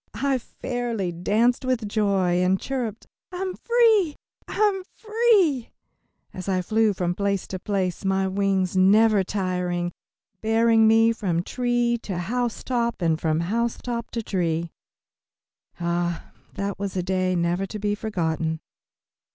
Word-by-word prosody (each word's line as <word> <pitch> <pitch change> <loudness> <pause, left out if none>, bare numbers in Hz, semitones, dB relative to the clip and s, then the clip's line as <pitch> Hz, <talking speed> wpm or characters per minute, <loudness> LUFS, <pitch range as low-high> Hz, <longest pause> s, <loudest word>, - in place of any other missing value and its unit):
I 275 -1 +1
fairly 235 -6 -3
danced 215 +9 +1
with 255 -4 -1
joy, 195 -4 +1
and 190 +1 +2
chirped, 240 -5 -4 0.3
"I'm 370 +1 -3
free, 445 -10 +3 0.3
I'm 410 -2 +1
free," 425 - +2 0.6
as 185 +1 -6
I 185 -1 +1
flew 220 +2 +2
from 180 -2 -1
place 200 0 -1
to 185 - -4
place, 190 -2 -2
my 190 0 +1
wings, 190 -1 0
never 205 +2 +5
tiring, 180 -2 -2 0.5
bearing 225 0 +4
me 225 +1 +5
from 175 -6 -1
tree 240 +1 0
to 190 -4 -4
housetop 235 +4 -1
and 160 -1 +1
from 160 0 +1
housetop 235 +4 -2
to 230 - -4
tree. 170 -4 -1 1.1
Ah, 170 0 -2 0.2
that 200 -1 -3
was 200 -1 -3
a 180 - 0
day 185 0 0
never 175 +3 0
to 215 - -6
be 205 0 -1
forgotten. 165 -6 -2
200 Hz, 130 wpm, -24 LUFS, 180-235 Hz, 1.1 s, never